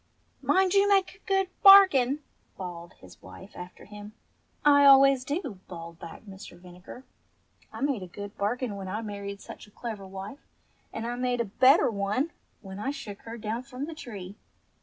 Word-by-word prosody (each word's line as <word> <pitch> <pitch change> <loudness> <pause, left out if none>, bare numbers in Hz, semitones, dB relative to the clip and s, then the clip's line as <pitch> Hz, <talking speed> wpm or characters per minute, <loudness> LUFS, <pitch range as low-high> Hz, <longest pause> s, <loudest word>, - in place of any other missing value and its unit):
"Mind 380 0 +2
you 400 0 +4
make 390 -2 +2
a - - -37
good 385 -1 +1
bargain," 305 - +7 0.3
bawled 175 -2 -8
his 90 -1 -17
wife 190 - -13
after 180 0 -10
him. 210 0 -11 0.5
"I 285 -1 +6
always 275 -1 +7
do," 285 - -4
bawled 170 -2 -10
back 170 +3 -10
Mr. 195 -2 -12
Vinegar. 180 +7 -13 0.7
"I - - -9
made 275 -6 0
a 185 - -7
good 205 +3 -9
bargain 215 +2 -2
when 195 -1 -7
I 215 +4 -4
married 200 -1 -7
such - - -11
a - - -18
clever 210 -2 -7
wife, 195 +7 -8 0.5
and 225 - -5
I 240 - -3
made 250 -1 -1
a 235 - 0
better 255 - +4
one 210 +10 -1 0.3
when 195 -1 -9
I 240 - -3
shook 250 -8 -7
her 230 +1 -7
down 225 +1 -4
from 255 +1 -7
the 325 - -7
tree. 205 -11 -9
220 Hz, 180 wpm, -27 LUFS, 195-275 Hz, 0.7 s, bargain